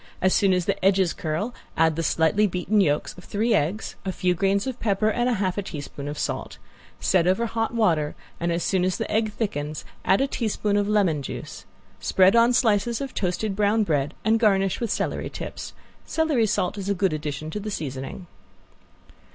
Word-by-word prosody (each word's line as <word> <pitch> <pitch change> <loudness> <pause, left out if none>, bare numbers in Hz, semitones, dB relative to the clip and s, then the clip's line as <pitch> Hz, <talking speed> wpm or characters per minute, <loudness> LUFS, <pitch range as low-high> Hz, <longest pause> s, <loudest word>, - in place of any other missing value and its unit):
As 185 0 +3
soon 195 -2 +3
as 180 -2 +1
the 200 -1 -2
edges 190 -2 +3
curl 165 +10 -3 0.2
add 160 -1 +3
the 165 - -1
slightly 165 +6 +2
beaten 190 +3 +1
yolks 150 -5 0
of - - -14
three 220 +5 0
eggs, 180 +9 0
a 190 - -2
few 180 -1 +1
grains 195 +2 +1
of 260 -2 -4
pepper 215 0 +1
and 240 +3 +1
half 200 -5 0
a - - 0
teaspoon 145 -5 -7
of 145 +1 -5
salt. - - -3 0.4
Set 180 -2 +2
over 190 +6 +2
hot 225 0 -2
water 165 -10 +2 0.2
and 170 0 0
as 170 0 -1
soon 190 -2 +1
as 185 -1 0
the - - -3
egg 215 0 +1
thickens 155 -9 -3 0.2
add 190 - +3
a 270 - +3
teaspoon 215 -5 -1
of 205 0 +2
lemon 190 -8 +2
juice. 135 - -7 0.3
Spread 190 +3 +4
on 235 +1 +6
slices 230 -1 +2
of 275 -2 -5
toasted 190 +2 -1
brown 210 +2 +2
bread 150 -5 0
and 225 +1 +3
garnish 195 -4 +2
with 235 - -2
celery - - -2
tips. - - -7 0.3
Celery 300 -9 +1
salt 195 -1 -1
is 195 0 -4
a 200 - +1
good 190 -2 +1
addition 150 0 -4
to 210 - -3
the 210 +1 -5
seasoning. 135 0 -5
195 Hz, 195 wpm, -24 LUFS, 170-215 Hz, 0.4 s, on